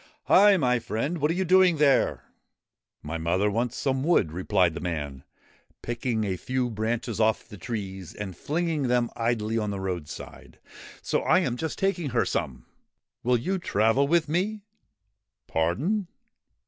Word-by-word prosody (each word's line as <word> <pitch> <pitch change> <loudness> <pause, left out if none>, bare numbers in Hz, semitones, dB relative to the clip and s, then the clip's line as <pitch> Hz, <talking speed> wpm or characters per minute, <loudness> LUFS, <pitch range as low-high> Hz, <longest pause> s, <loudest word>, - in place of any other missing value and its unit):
' - - -46
Hi! 200 0 +6
my 125 -6 +2
friend! 120 +10 -3
What 150 +1 +1
are 165 - 0
you 190 +1 0
doing 185 -1 +5
there? 140 -3 +3 0.3
' - - -63
' - - -64 0.2
My 80 +2 -4
mother 90 +5 +1
wants 120 +3 -1
some 135 -1 0
wood,' 145 - +3
replied 90 0 +1
the - - -5
man, 75 -6 -4 0.6
picking 120 -1 -2
a 95 -3 -2
few 125 +3 -2
branches 115 +1 -2
off 110 -1 +1
the - - -10
trees 95 -4 -6
and 95 -4 -6
flinging 155 - -1
them 120 -1 +1
idly 115 -1 0
on 105 -1 -2
the 100 -1 -3
roadside, 90 -5 -6 0.3
' - - -16
so - - 0
I - - +3
am 120 - -1
just 160 +5 -4
taking 175 -6 0
her 120 -2 +1
some.' - - -3 0.3
' - - -59
Will 125 +1 +3
you 185 +11 -2
travel 115 - +2
with 165 +1 +2
me? 195 +7 -1 0.4
' 105 +1 -55
'Pardon?' 145 - 0
120 Hz, 175 wpm, -26 LUFS, 100-155 Hz, 0.6 s, Hi